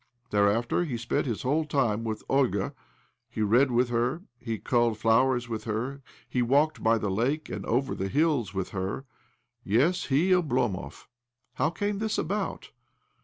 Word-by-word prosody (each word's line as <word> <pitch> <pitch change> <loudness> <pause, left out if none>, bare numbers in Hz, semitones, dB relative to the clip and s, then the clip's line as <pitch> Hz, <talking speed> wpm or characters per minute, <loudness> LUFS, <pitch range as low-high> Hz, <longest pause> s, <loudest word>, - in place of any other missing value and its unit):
Thereafter 105 +9 +2
he 135 -8 -3
spent 120 +3 -1
his 115 -4 -3
whole 145 +5 +1
time 125 -7 0
with 110 -1 -4
Olga 120 -8 +1 0.3
— - - -41
he 110 - -2
read 120 +7 +4
with 120 0 +2
her, 120 +8 0 0.2
he 115 -2 -3
culled 120 -2 +1
flowers 120 +3 +3
with 110 -2 -5
her, 125 +6 -3 0.3
he 125 - 0
walked 140 +6 +2
by 115 +1 +3
the 105 -3 -2
lake 130 +10 -1
and - - -5
over 130 +3 +1
the 95 - -3
hills 140 - +1
with 95 -1 -3
her. 95 +7 -4 0.6
Yes, 135 - +2
he, 155 +8 +2
Oblomov! 130 - 0 0.5
How 155 - +1
came 205 +4 -2
this 220 0 -1
about? 200 +4 -3
120 Hz, 165 wpm, -28 LUFS, 110-145 Hz, 0.6 s, read